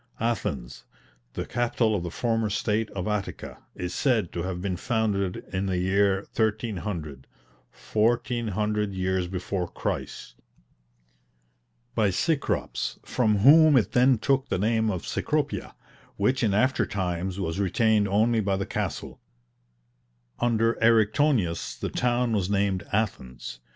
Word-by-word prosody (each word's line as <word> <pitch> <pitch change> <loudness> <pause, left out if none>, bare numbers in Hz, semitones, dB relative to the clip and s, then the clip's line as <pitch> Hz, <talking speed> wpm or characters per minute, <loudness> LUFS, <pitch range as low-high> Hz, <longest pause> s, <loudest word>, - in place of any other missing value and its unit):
Athens, 75 - -2 0.5
the - - -4
capital 115 -1 0
of 100 - 0
the 85 - -4
former 115 +3 0
State 105 +2 0
of 90 -1 -3
Attica, 105 -2 -4 0.2
is 90 0 -4
said 115 - +1
to 85 - -3
have 90 0 -3
been 95 0 -2
founded 100 -3 -1
in 95 +1 -1
the 95 -1 0
year 95 +1 +2
1300, 105 - -2 0.4
fourteen 120 +2 0
hundred 105 0 -1
years 95 -1 0
before 90 0 -3
Christ, - - -5 1.6
by 105 -2 +2
Cecrops, 150 - -1
from 110 -4 +1
whom 155 0 +8
it 115 - +1
then 125 0 +4
took 135 +3 0
the - - 0
name 110 +3 +1
of 90 -5 -3
Cecropia, - - -2 0.4
which 125 +6 +1
in 105 -5 +2
after 130 +5 +2
times 95 -1 -3
was 90 -1 -2
retained 105 +2 +2
only 110 +4 +2
by 100 -2 0
the 95 - -2
castle: - - -4 1.2
under 115 -1 +2
Eriktonius 110 - +2
the - - -3
town 125 -1 +1
was 100 -4 0
named 100 -2 +1
"Athens." 65 - -3
105 Hz, 130 wpm, -26 LUFS, 95-115 Hz, 1.6 s, whom